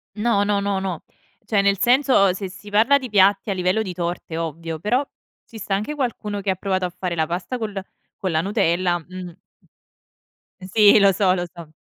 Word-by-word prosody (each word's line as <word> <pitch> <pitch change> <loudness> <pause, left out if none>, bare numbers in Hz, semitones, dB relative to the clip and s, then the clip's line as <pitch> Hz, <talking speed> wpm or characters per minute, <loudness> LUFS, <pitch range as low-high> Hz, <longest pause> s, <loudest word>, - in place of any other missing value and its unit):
No, 210 -2 +1
no, 205 -1 +1
no, 200 -1 -1
no. 185 -4 -4 0.4
Cioè, 205 -3 +2
nel 200 -1 +2
senso, 255 -4 +4
ehm, - - +2
se 195 0 -5
si 195 +3 -12
parla 225 +7 +4
di 260 -2 -7
piatti 200 0 +3
a - - 0
livello 185 +4 +1
di 190 -4 -5
torte, 175 -1 -4
ovvio, 165 0 -4
però 245 - 0 0.4
ci 225 - -11
sta 200 -1 -2
anche 215 +10 -2
qualcuno 220 -7 -3
che 200 0 -1
ha - - +1
provato 190 -1 -1
a - - -6
fare 180 -2 -3
la 160 -1 0
pasta 175 +8 -4
col 210 -4 -4 0.4
con 185 -3 -2
la 160 - +2
Nutella, 180 -2 +1
mh. 180 +1 -9 1.4
Sì, 210 -1 +7
lo 200 -1 +5
so, 190 0 +2
lo 175 -1 -2
so. 170 -2 -11
195 Hz, 205 wpm, -22 LUFS, 180-210 Hz, 1.4 s, Sì